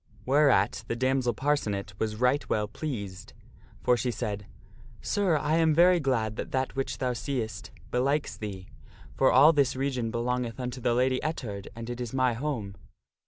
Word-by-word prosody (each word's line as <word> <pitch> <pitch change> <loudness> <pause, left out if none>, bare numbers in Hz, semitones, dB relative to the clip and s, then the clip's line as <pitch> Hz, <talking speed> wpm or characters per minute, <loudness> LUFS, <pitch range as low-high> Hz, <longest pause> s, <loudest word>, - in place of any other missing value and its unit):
Whereat 135 -7 +3
the - - -2
damsel 130 -1 +1
Parcenet 105 -8 -1
was 110 -1 -1
right 125 +5 +1
well 105 -1 +1
pleased, 105 -7 -6 0.5
for 125 - +4
she 120 +1 -1
said, 105 -3 -4 0.3
" 115 0 -22
Sir, 195 -6 +2
1 150 +1 -2
am 160 -2 +3
very 175 +2 +6
glad 115 -7 0
that - - -4
that 130 0 -1
which 135 0 -2
thou 125 -1 -1
seest 120 -2 -4 0.2
belikes 140 +4 0
thee; 95 -3 -7 0.5
for 135 - +3
all 145 +5 +7
this 140 -4 +2
region 130 -3 -1
belongeth 120 0 -2
unto 125 0 -4
the 120 0 +1
Lady 130 +1 +2
Ettard, 110 -10 -4
and 115 0 -7
it 120 0 -5
is 120 +1 -5
my 130 -2 +3
home. 115 -6 -3
125 Hz, 170 wpm, -28 LUFS, 110-140 Hz, 0.5 s, all